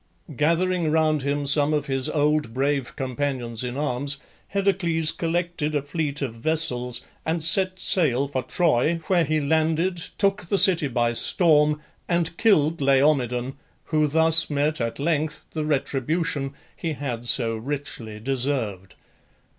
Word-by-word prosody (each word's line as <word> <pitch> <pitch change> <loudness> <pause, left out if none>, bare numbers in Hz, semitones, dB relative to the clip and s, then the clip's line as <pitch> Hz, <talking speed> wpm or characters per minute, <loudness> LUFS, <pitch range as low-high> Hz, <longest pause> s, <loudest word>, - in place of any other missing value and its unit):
Gathering 170 +3 +1
round 155 -1 +1
him 140 +1 -2
some 145 +2 +3
of 150 - -2
his 135 -1 -1
old 150 -5 0
brave 140 -1 -1
companions 130 -3 -3
in 125 +1 -5
arms, 140 -1 -1 0.3
Heracles 175 -5 +1
collected 170 -2 -2
a 145 - 0
fleet 150 -1 -3
of 125 -4 -4
vessels 125 -2 0 0.2
and 160 0 -2
set 185 +3 +3
sail 140 -9 +2
for 135 -2 -3
Troy, 155 +2 +1
where 175 -1 +2
he 155 0 0
landed, 160 +4 0 0.2
took 195 -2 +1
the 200 - +1
city 175 -6 +6
by 120 -2 0
storm, 150 +2 +3 0.3
and 170 -1 0
killed 165 -8 +2
Laomedon, 135 -2 +1 0.3
who 155 -1 +1
thus 160 +2 +4
met 150 0 -1
at 115 0 -3
length 155 0 -2
the 155 -1 -3
retribution 140 0 -2 0.2
he 165 -2 -4
had 120 -5 -5
so 115 -3 +3
richly 115 -3 -6
deserved. 120 -6 -2
150 Hz, 140 wpm, -23 LUFS, 135-160 Hz, 0.3 s, city